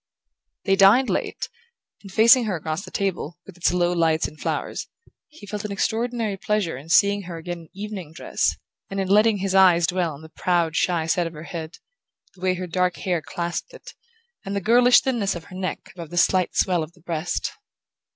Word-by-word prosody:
They 195 Hz, -, +4 dB
dined 205 Hz, +7 st, +5 dB
late, -, -, -2 dB, 0.5 s
and 195 Hz, -, -11 dB
facing 230 Hz, +4 st, +6 dB
her 205 Hz, -4 st, -1 dB
across 160 Hz, +2 st, -4 dB
the -, -, -9 dB
table, 180 Hz, -4 st, -3 dB
with 195 Hz, -, -12 dB
its 175 Hz, -, +1 dB
low 175 Hz, 0 st, +1 dB
lights 165 Hz, -2 st, +2 dB
and 155 Hz, -, -14 dB
flowers, -, -, -3 dB, 0.4 s
he 305 Hz, -9 st, -14 dB
felt 205 Hz, +1 st, -5 dB
an 210 Hz, -, -4 dB
extraordinary 225 Hz, 0 st, -1 dB
pleasure 205 Hz, -5 st, -1 dB
in 140 Hz, +5 st, -11 dB
seeing 200 Hz, +3 st, +4 dB
her 170 Hz, -, -5 dB
again 175 Hz, +1 st, -6 dB
in 165 Hz, -2 st, -15 dB
evening 195 Hz, -5 st, -7 dB
dress, 160 Hz, -, -1 dB, 0.3 s
and 195 Hz, -, -3 dB
in 190 Hz, -, -1 dB
letting 210 Hz, +1 st, +5 dB
his 195 Hz, 0 st, -2 dB
eyes 180 Hz, -3 st, +6 dB
dwell 175 Hz, -2 st, -1 dB
on 145 Hz, -, -14 dB
the 160 Hz, -, -11 dB
proud 170 Hz, -1 st, 0 dB
shy 170 Hz, -3 st, +1 dB
set 170 Hz, +1 st, +1 dB
of 165 Hz, -, -8 dB
her 155 Hz, 0 st, -9 dB
head, 165 Hz, -1 st, -7 dB, 0.6 s
the 185 Hz, -, -20 dB
way 185 Hz, 0 st, +1 dB
her 185 Hz, 0 st, -4 dB
dark 180 Hz, +1 st, 0 dB
hair 175 Hz, -3 st, -1 dB
clasped 170 Hz, +3 st, -4 dB
it, -, -, -12 dB, 0.5 s
and 195 Hz, +1 st, -4 dB
the -, -, +1 dB
girlish 245 Hz, +5 st, +5 dB
thinness 225 Hz, -8 st, 0 dB
of 170 Hz, -, -7 dB
her 185 Hz, -, -13 dB
neck 185 Hz, 0 st, -5 dB
above 170 Hz, -4 st, -9 dB
the 175 Hz, -, -7 dB
slight 185 Hz, +1 st, +2 dB
swell 180 Hz, -3 st, +2 dB
of 155 Hz, +2 st, -6 dB
the 175 Hz, -, -23 dB
breast. 170 Hz, 0 st, -2 dB
185 Hz, 205 wpm, -23 LUFS, 170-200 Hz, 0.6 s, facing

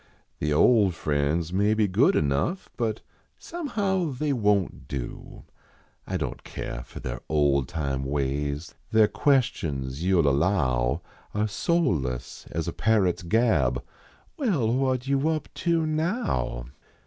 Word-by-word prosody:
The 75 Hz, -, 0 dB
old 95 Hz, +4 st, +4 dB
friends 75 Hz, +3 st, 0 dB
may 105 Hz, +3 st, +3 dB
be 110 Hz, -1 st, +3 dB
good 90 Hz, -, +3 dB
enough, 75 Hz, -, 0 dB
But 110 Hz, -3 st, -1 dB, 0.4 s
somehow 205 Hz, -, -1 dB
they 145 Hz, +3 st, -1 dB
won 105 Hz, -5 st, +3 dB
t -, -, -15 dB
do. 65 Hz, -3 st, -6 dB, 0.6 s
I -, -, -1 dB
don -, -, -2 dB
t -, -, -28 dB
care -, -, -5 dB
for -, -, -10 dB
their -, -, -5 dB
old 70 Hz, -3 st, +2 dB
time 70 Hz, -5 st, -2 dB
ways; 70 Hz, +3 st, -2 dB, 0.2 s
Their 110 Hz, -1 st, +5 dB
questions 80 Hz, -, 0 dB
you 95 Hz, -1 st, +3 dB
ll 75 Hz, -, +4 dB
allow 70 Hz, -5 st, +1 dB, 0.3 s
Are 105 Hz, +1 st, +1 dB
soulless 90 Hz, -, -1 dB
as 80 Hz, 0 st, -3 dB
a -, -, -2 dB
parrot 105 Hz, -6 st, +2 dB
s -, -, -8 dB
gab: 85 Hz, -, +2 dB, 0.3 s
" -, -, -32 dB
Well, 155 Hz, -, +1 dB
what 130 Hz, -1 st, +1 dB
you 140 Hz, +3 st, +2 dB
up 155 Hz, -1 st, -2 dB
to 170 Hz, -2 st, +1 dB
now? 155 Hz, -, -1 dB
95 Hz, 145 wpm, -26 LUFS, -, 0.6 s, Their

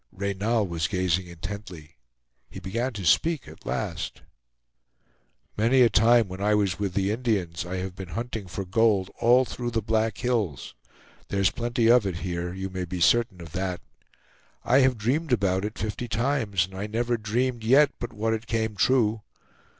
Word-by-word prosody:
Reynal 100 Hz, +3 st, -1 dB
was 85 Hz, -2 st, -2 dB
gazing 90 Hz, -1 st, 0 dB
intently; 85 Hz, -2 st, -8 dB, 0.5 s
he -, -, -9 dB
began 115 Hz, +7 st, -2 dB
to 100 Hz, -4 st, -6 dB
speak 160 Hz, -, +2 dB
at -, -, -13 dB
last: -, -, -4 dB, 1.3 s
"Many 120 Hz, +5 st, +3 dB
a 115 Hz, -, +4 dB
time, 115 Hz, +1 st, +5 dB
when 95 Hz, +1 st, -8 dB
I 105 Hz, +1 st, +3 dB
was 100 Hz, -3 st, 0 dB
with 100 Hz, -3 st, -2 dB
the 100 Hz, 0 st, +1 dB
Indians, 100 Hz, -8 st, -1 dB
I 90 Hz, -, -4 dB
have 95 Hz, 0 st, -4 dB
been 95 Hz, 0 st, -7 dB
hunting 115 Hz, -4 st, -4 dB
for 95 Hz, +2 st, -5 dB
gold 100 Hz, 0 st, +2 dB
all 125 Hz, +3 st, +5 dB
through 120 Hz, 0 st, -4 dB
the 115 Hz, -1 st, -1 dB
Black 110 Hz, +1 st, 0 dB
Hills. 110 Hz, -, -2 dB, 0.5 s
There's 100 Hz, -1 st, +1 dB
plenty 120 Hz, 0 st, -1 dB
of 120 Hz, -3 st, +5 dB
it 90 Hz, -, -3 dB
here; 90 Hz, -1 st, -3 dB
you 95 Hz, +1 st, -5 dB
may 95 Hz, -1 st, -3 dB
be 90 Hz, +1 st, -5 dB
certain 110 Hz, +1 st, +2 dB
of 80 Hz, -1 st, -10 dB
that. 90 Hz, 0 st, -3 dB, 0.8 s
I 130 Hz, -, +4 dB
have 130 Hz, -2 st, +3 dB
dreamed 135 Hz, +8 st, -1 dB
about 95 Hz, -4 st, +1 dB
it 105 Hz, -, -5 dB
fifty 110 Hz, +3 st, -4 dB
times, 110 Hz, -5 st, 0 dB
and 95 Hz, -, -16 dB
I 95 Hz, +2 st, -4 dB
never 120 Hz, +2 st, 0 dB
dreamed 115 Hz, +2 st, -1 dB
yet 140 Hz, +5 st, +5 dB
but 120 Hz, 0 st, -5 dB
what 110 Hz, +1 st, -1 dB
it 110 Hz, 0 st, -4 dB
came 110 Hz, -2 st, -1 dB
true. 110 Hz, 0 st, +2 dB
105 Hz, 175 wpm, -26 LUFS, 95-120 Hz, 1.3 s, time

